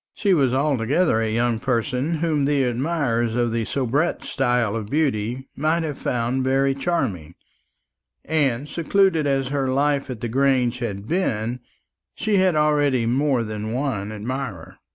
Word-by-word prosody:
She 200 -3 +2
was 135 -7 +3
altogether 135 0 +1
a 110 - 0
young 115 +1 0
person 130 +5 -1
whom 155 -3 0
the 140 -1 +2
admirers 125 -3 0
of 120 -1 +1
the 115 -1 -1
soubrette 140 +7 -1
style 125 -6 0
of 110 -3 -4
beauty 130 -4 -1
might 155 +3 +1
have 150 -3 -4
found 125 +2 -1
very 135 +1 +2
charming; 105 - -2 0.9
and, 145 -4 0
secluded 170 0 +2
as 135 -2 0
her 140 -1 -1
life 140 +1 +1
at 125 -4 -6
the 120 - -2
Grange 130 0 +1
had 105 -4 -4
been, 120 - -1 0.6
she 210 -1 0
had 185 -3 +3
already 145 -5 +2
more 130 +1 +1
than 110 0 -4
one 120 -6 -2
admirer. 125 +6 -5
130 Hz, 150 wpm, -23 LUFS, 115-150 Hz, 0.9 s, was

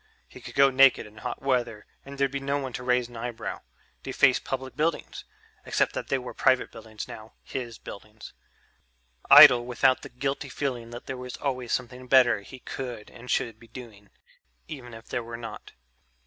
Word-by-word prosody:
He - - -14
could - - -10
go 135 0 +6
naked 135 0 +5
in 105 +1 -16
hot 125 +3 -6
weather 120 -5 -1 0.2
and 140 0 -10
there'd 140 -1 +1
be 140 - -3
no 140 +1 -1
one 135 -3 -5
to 125 - -5
raise 125 -1 +1
an 120 - -15
eyebrow, 115 0 -5 0.4
deface - - +3
public 130 -1 -5
buildings 160 +2 -2 0.4
(except - - 0
that - - -5
they 135 - +1
were 125 -1 -7
private 130 -1 +2
buildings 110 -1 -9
now, 110 0 -11
his 120 -4 -6
buildings), 105 +2 -11 1.0
idle 120 -1 +10
without 125 +2 +2
the - - -9
guilty 135 +2 -3
feeling 125 -4 -4
that 120 +1 -9
there 130 - -5
was 125 0 -7
always 130 -4 -3
something 125 0 -3
better 125 -5 +5
he 100 +6 -12
could 125 -4 -7
and 125 +1 -13
should 115 -2 -1
be 115 - -16
doing... 110 -5 -12 0.6
even 125 -6 -9
if 115 - -13
there 120 - -2
were 115 0 -7
not. 115 -1 -9
125 Hz, 185 wpm, -27 LUFS, 115-130 Hz, 1.0 s, idle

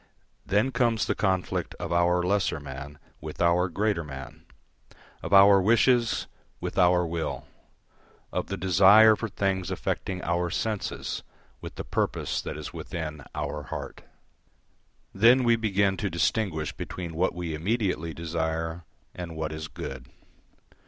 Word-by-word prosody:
Then 105 +7 +2
comes 120 -3 +1
the - - 0
conflict 95 -3 -1
of 85 - -4
our 90 +1 +3
lesser 95 -4 +1
man 70 +1 -8 0.2
with - - -8
our 85 +2 +3
greater 100 -1 0
man, 65 -3 -9 0.8
of - - -6
our 100 0 +8
wishes 115 +3 +3 0.3
with - - -5
our 90 -1 +4
will, 80 -1 -3 0.9
of - - -2
the 100 - -4
desire 95 +5 +7
for 115 +1 -4
things 95 -3 -1
affecting 90 -2 -3
our 85 0 0
senses 105 +3 -3 0.4
with - - -8
the - - -5
purpose - - -1
that - - -6
is - - -7
within 75 -3 -6
our 75 0 -3
heart. - - -7 1.1
Then 120 +6 +5
we 120 -1 +4
begin 100 -3 +1
to 100 - -2
distinguish 85 -3 -1
between 85 -3 -6
what 90 +3 0
we 85 -2 -4
immediately 90 -1 -1
desire 80 0 -3 0.3
and 85 -2 -7
what 80 -1 -3
is 80 0 -5
good. 65 -4 -7
90 Hz, 140 wpm, -27 LUFS, 80-100 Hz, 1.1 s, our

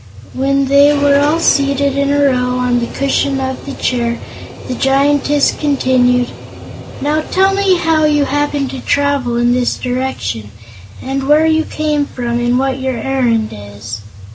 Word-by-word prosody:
When 275 +1 0
they 285 +2 +4
were 285 0 +3
all 300 +3 +2
seated 280 -2 +1
in 280 0 0
a 285 0 +2
row 250 -2 +1
on 250 -1 +1
the 235 - -2
cushion 275 0 -1
of 265 +1 -4
the 280 - -5
chair, 235 -3 -1 0.5
the 255 - -3
Giantess 280 +2 +2
continued: 255 -4 +1 0.7
"Now 300 +2 0
tell 385 +4 +1
me 390 -2 +2
how 325 -2 +1
you 295 -1 +2
happened 290 -1 -1
to 265 - -6
travel 285 -4 0
in 240 0 +2
this 250 -1 0
direction, 245 - -3 0.5
and 270 0 -3
where 305 +2 +5
you 320 0 +2
came 300 -2 -1
from 240 -1 -3
and 240 +1 +1
what 265 0 -1
your 260 -2 -2
errand 235 -3 0
is." 105 +2 -9
270 Hz, 160 wpm, -15 LUFS, 250-285 Hz, 0.7 s, where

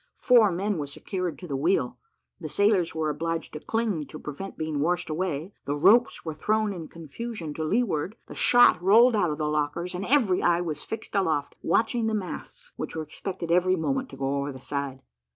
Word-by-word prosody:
Four 235 -6 +5
men 195 +1 -1
were 145 - -3
secured 180 +4 -4
to 180 - -9
the 140 - -3
wheel 165 +8 0 0.4
the - - -6
sailors 200 -5 +2
were 155 -1 0
obliged 165 +2 -3
to 150 - -5
cling, 210 -7 -1
to - - -9
prevent 150 +7 -7
being 155 -2 -2
washed 175 +2 0
away 170 +1 -3
the 145 - -1
ropes 200 +11 +4
were 160 - -3
thrown 215 +6 0
in 165 -4 -7
confusion 170 - -7
to 160 - -4
leeward 190 -1 0
the - - -10
shot 245 -8 +5
rolled 225 +6 +6
out 180 -5 +2
of 150 - -3
the 155 - -1
lockers, 150 +4 -1
and 180 +3 -4
every 230 -9 +3
eye 175 0 +3
was 155 -4 -3
fixed 225 0 -7
aloft, 160 -8 0
watching 230 0 +1
the 220 - 0
masts, 350 - -6
which - - -5
were 160 - -2
expected 170 +2 -5
every 180 +1 +4
moment 265 +10 -1
to - - -11
go 135 +1 -1
over 140 +1 -2
the 130 - -10
side. 140 0 -4
175 Hz, 205 wpm, -26 LUFS, 155-210 Hz, 0.4 s, rolled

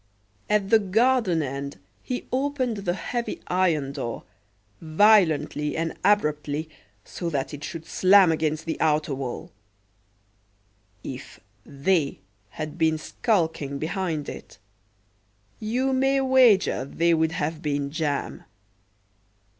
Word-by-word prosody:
At 210 -2 +1
the 225 - +7
garden 210 -4 +2
end 140 -1 -5 0.2
he 250 - -4
opened 260 -3 -1
the 180 -3 -2
heavy 235 +5 -4
iron 165 -7 +1
door, 130 -5 -5 0.6
violently 160 -4 +3
and 165 0 -1
abruptly 155 -6 +1 0.4
so 170 - -5
that 140 -2 -3
it 145 0 -8
should 165 0 -6
slam 190 -1 +5
against 155 0 -1
the 165 - -4
outer 150 -2 +1
wall. 130 -2 -5 1.5
If 135 0 -8 0.3
"they" 145 +1 0 0.3
had 155 +7 -7
been 160 -1 +2
skulking 160 - -1
behind 160 -1 -3
it, - - -9 1.0
you 250 +5 0
may 270 +1 +2
wager 255 - +4
they 170 +5 +1
would 160 0 +1
have 160 -1 -3
been 145 -2 -2
jam. 150 -3 -3
165 Hz, 115 wpm, -25 LUFS, 150-205 Hz, 1.5 s, the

